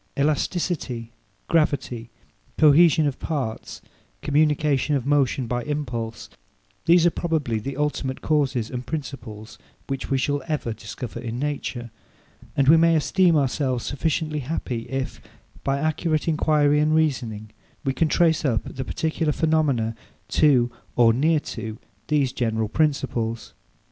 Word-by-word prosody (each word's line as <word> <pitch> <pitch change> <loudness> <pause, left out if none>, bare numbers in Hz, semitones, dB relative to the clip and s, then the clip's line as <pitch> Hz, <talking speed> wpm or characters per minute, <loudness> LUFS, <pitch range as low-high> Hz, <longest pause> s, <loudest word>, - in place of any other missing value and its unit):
Elasticity, 145 -5 -1 0.4
gravity, 135 -7 0 0.5
cohesion 155 +1 +6
of 140 -3 -2
parts, 135 -9 -4 0.4
communication 150 -1 +2
of 130 -3 -1
motion 140 -2 +2
by 120 +1 -2
impulse; 120 -7 -4 0.6
these 170 0 +6
are 175 - +5
probably 155 -10 -1
the 135 +5 -5
ultimate 145 -3 -2
causes 135 -7 0
and 125 0 -5
principles 120 -8 -7 0.3
which 135 -1 -4
we 135 - +2
shall 145 +2 0
ever 150 -7 -2
discover 110 +2 -7
in 115 0 -5
nature; 130 -4 -3 0.7
and 135 - +3
we 160 +3 +8
may 165 0 +4
esteem 175 +2 +3
ourselves 130 -3 0
sufficiently 155 +1 -1
happy, 125 -4 -4
if, 135 0 -4 0.4
by 135 0 0
accurate 155 +1 0
enquiry 150 -2 +3
and 155 +1 +3
reasoning, 120 -9 -1 0.3
we 135 - +1
can 160 +5 +1
trace 160 0 +2
up 120 -7 +1
the 130 - -5
particular 160 +2 -1
phenomena 145 -8 +1 0.3
to, 125 -5 +3 0.2
or 115 -2 +5
near 155 +6 +3
to, 110 -5 -6 0.3
these 145 -4 +1
general 110 -2 -1
principles. 125 -6 -1
140 Hz, 130 wpm, -24 LUFS, 120-155 Hz, 0.7 s, we